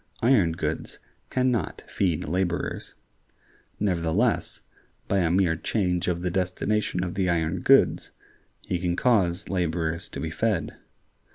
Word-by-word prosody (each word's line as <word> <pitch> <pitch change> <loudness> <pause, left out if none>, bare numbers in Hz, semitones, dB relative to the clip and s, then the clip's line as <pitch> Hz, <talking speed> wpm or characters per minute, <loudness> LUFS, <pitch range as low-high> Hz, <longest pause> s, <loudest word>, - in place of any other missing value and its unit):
Iron 110 -10 +4
goods 85 - -3 0.3
can 130 0 +2
not 110 -9 -2
feed 85 -8 0
laborers. 90 +1 -2 0.8
Nevertheless, 95 +4 0 0.4
by 100 - +2
a 85 -3 +2
mere 90 -2 +3
change 90 0 -1
of 90 -1 -1
the 90 - 0
destination 95 +1 0
of 90 -1 -3
the 95 -1 0
iron 80 -2 0
goods, - - +4 0.6
he 90 - -1
can 85 -1 0
cause 95 -6 +2
laborers 85 -1 -1
to - - -7
be 80 - -3
fed. 105 -1 -1
90 Hz, 130 wpm, -26 LUFS, 85-100 Hz, 0.8 s, Iron